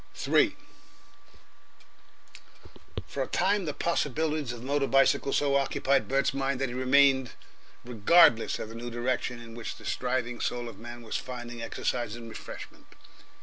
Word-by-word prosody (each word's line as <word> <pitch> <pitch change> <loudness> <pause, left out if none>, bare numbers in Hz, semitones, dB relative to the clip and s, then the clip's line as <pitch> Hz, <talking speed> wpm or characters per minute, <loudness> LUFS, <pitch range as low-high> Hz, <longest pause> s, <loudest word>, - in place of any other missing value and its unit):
3 - - +2 2.5
For - - -5
a - - -1
time 195 +1 +1
the 150 - -2
possibilities 155 -3 -1
of 120 -1 -8
the - - -9
motor 140 0 +1
bicycle 135 +1 +3
so 140 -1 +2
occupied 140 0 +1
Bert's 135 0 +1
mind 135 -1 -1
that 135 -1 -1
he - - -6
remained 130 0 +3 0.5
regardless 120 +1 +5
of 110 - -6
the - - -9
new 120 +1 -6
direction 120 0 -2
in 115 -1 -11
which 115 0 -6
the - - -14
striving 125 -1 -2
soul 120 -1 -2
of 110 -4 -10
man 120 +1 -9
was 110 - -3
finding 120 -2 -7
exercise 115 -1 -2
and 115 -1 -9
refreshment. - - -10
125 Hz, 150 wpm, -28 LUFS, 120-140 Hz, 2.5 s, regardless